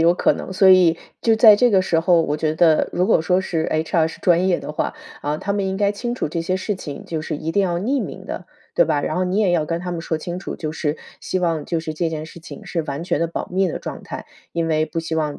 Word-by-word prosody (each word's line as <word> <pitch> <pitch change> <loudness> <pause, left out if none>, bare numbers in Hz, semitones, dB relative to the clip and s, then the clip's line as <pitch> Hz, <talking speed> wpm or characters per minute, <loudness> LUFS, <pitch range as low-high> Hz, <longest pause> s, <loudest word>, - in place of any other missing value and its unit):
有 170 +1 +5
可 - - +3
能， - - -6
所 190 0 +6
以 180 -3 +6 0.2
就 225 -1 +3
在 220 -1 +9
这 245 +4 +4
个 190 -3 +4
时 165 -3 +1
候， 170 0 +4
我 150 - -1
觉 155 0 -1
得 160 -1 +4
如 180 - +1
果 - - +4
说 180 +3 +2
是 165 -3 -1
，HR 160 +1 +1
是 - - -10
专 180 +1 +3
业 175 - +2
的 150 - -6
话， - - -2 0.3
啊， 150 +1 -1
他 200 - -2
们 200 -1 -1
应 190 - -2
该 200 0 +2
清 240 +4 -3
楚 245 - -2
这 165 - -2
些 185 +3 -1
事 195 +2 -2
情， 145 -6 -8
就 160 -2 -3
是 155 -1 -4
一 160 +2 -4
定 200 - +3
要 175 -2 0
匿 255 +9 0
名 - - -7
的， - - -6 0.3
对 - - +4
吧？ - - +1
然 - - -2
后 185 - +1
你 185 +3 0
也 205 -4 +3
要 160 -3 +1
跟 165 +1 -2
他 180 0 -4
们 170 - -3
说 165 -1 -2
清 175 +3 -5
楚， 185 - -6
就 155 -1 -4
是 155 -1 -2 0.2
希 185 - -2
望 165 -4 0
就 170 - -1
是 160 -1 -4
这 165 +2 -1
件 155 -1 -4
事 165 +1 -12
情 185 +5 -10
是 180 -3 -2
完 145 +1 -5
全 175 - 0
的 170 - +2
保 165 - -4
密 190 0 +2
的 - - -4
状 - - -7
态， - - -7 0.3
因 165 -1 -1
为 155 -1 +1
不 165 - -4
希 165 0 -3
望 150 -2 -1
170 Hz, 315 characters per minute, -21 LUFS, 160-190 Hz, 0.3 s, 在